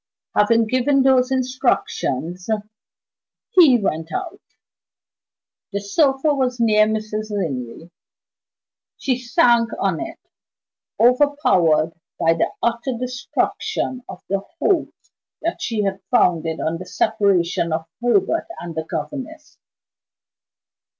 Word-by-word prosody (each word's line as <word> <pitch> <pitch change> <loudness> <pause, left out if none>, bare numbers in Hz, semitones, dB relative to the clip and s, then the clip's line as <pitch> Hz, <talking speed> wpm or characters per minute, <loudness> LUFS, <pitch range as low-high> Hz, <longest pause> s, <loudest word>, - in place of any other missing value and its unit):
Having 225 +2 +4
given 255 +4 +2
those 260 -1 +4
instructions 245 - -1 1.0
he 320 - +7
went 165 -6 -2
out. 370 -3 -5 1.3
The 200 - -2
sofa 270 +8 +2
was 255 -3 -1
near 215 -2 +4
Mrs. 215 0 -3
Linley. 160 - -4 1.1
She 255 -2 -1
sank 235 -1 +3
on - - 0
it, - - -6 0.8
overpowered 235 - +3 0.3
by 165 0 +4
the - - 0
utter 235 +2 -1
destruction 250 +1 -2
of 180 - -9
the 195 0 0 0.2
hopes 350 +1 -1 0.3
that 335 +2 -2
she 220 -4 -1
had 195 -1 -2
founded 165 -9 +2
on 165 +1 -2
the 185 - -8
separation 180 -5 +1
of 160 +1 -2 0.2
Herbert 330 +7 +1
and 170 -1 -7
the 160 0 -4
governess. 270 - -6
230 Hz, 105 wpm, -21 LUFS, 180-260 Hz, 1.3 s, he